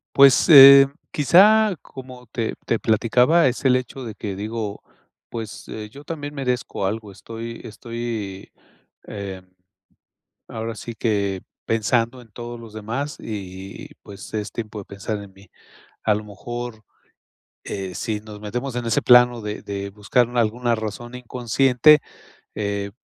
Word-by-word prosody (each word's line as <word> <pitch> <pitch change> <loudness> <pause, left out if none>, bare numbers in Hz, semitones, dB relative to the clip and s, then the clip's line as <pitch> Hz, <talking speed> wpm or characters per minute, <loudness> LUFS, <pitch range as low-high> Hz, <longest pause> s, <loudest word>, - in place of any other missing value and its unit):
Pues, 140 +4 +6
eh, 140 -2 +11 0.2
quizá 200 +6 +5
como 130 -2 -12
te 115 0 -3
te 115 - 0
platicaba, 125 +9 +3
es 125 0 -2
el 130 -2 +4
hecho 130 +1 -6
de 115 -3 -6
que 100 -1 -5
digo: 105 +1 -5 0.5
"Pues, 110 -2 -7
eh, 105 -1 -7
yo 140 +6 -13
también 150 -2 -6
merezco 125 -7 -2
algo". 105 0 -4
Estoy 115 +4 -8
estoy, 115 -4 -6 0.5
em, 95 -3 -8 1.0
ahora 115 +1 -5
sí 115 +1 -8
que 100 -4 0 0.2
pensando 115 +3 0
en 120 - -16
todos 120 +2 -7
los 115 -2 -12
demás 115 +7 -4
y, 95 -2 -8
pues, 100 +2 -11
es 105 0 -3
tiempo 110 -2 -6
de - - -10
pensar 100 +2 -5
en 100 -1 -13
mí. 95 0 -19 0.6
A 105 - +3
lo 105 +1 -4
mejor, 120 +2 -7 0.8
eh, 95 -2 -5
si 110 -3 -2
nos 105 -1 -11
metemos 125 +5 -4
en 120 -1 -3
ese 115 - +2
plano 125 -1 +6
de 105 0 -5
de 100 0 -5
buscar 105 +4 +1
alguna 120 +1 +1
razón 110 +2 -6
inconsciente, 125 +4 +3 0.6
eh, 100 -1 -3
115 Hz, 145 wpm, -22 LUFS, 105-125 Hz, 1.0 s, eh